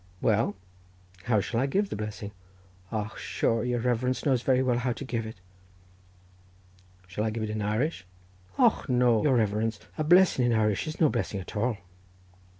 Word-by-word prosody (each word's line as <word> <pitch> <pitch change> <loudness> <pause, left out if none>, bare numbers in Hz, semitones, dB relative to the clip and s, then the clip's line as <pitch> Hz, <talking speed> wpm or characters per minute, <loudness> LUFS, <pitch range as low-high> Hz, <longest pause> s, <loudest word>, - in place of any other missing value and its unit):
"Well, 110 -1 +1 0.7
how 110 -4 +3
shall 115 +3 -2
I 135 - +1
give 195 +8 0
the - - -2
blessing?" 105 0 -5 0.6
"Och, 110 -1 -4
sure 115 -1 0
your 125 -1 0
reverence 125 +2 0
knows 130 -4 +2
very 130 0 +2
well 125 -2 +1
how 125 0 0
to 135 - -7
give 115 -3 -3
it." 110 - -8 1.7
"Shall 95 +4 -4
I 110 - +1
give 110 +1 -3
it 110 - -3
in 110 0 -3
Irish?" 105 - -1 0.5
"Och, - - +3
no, 125 -3 +3
your 140 -4 +3
reverence—a 110 +5 -1
blessing 175 -7 +5
in 120 - +2
Irish 105 0 +1
is 155 - -5
no 160 - +5
blessing 110 -5 -2
at 95 - -9
all." 115 +1 0
115 Hz, 170 wpm, -28 LUFS, 105-125 Hz, 1.7 s, blessing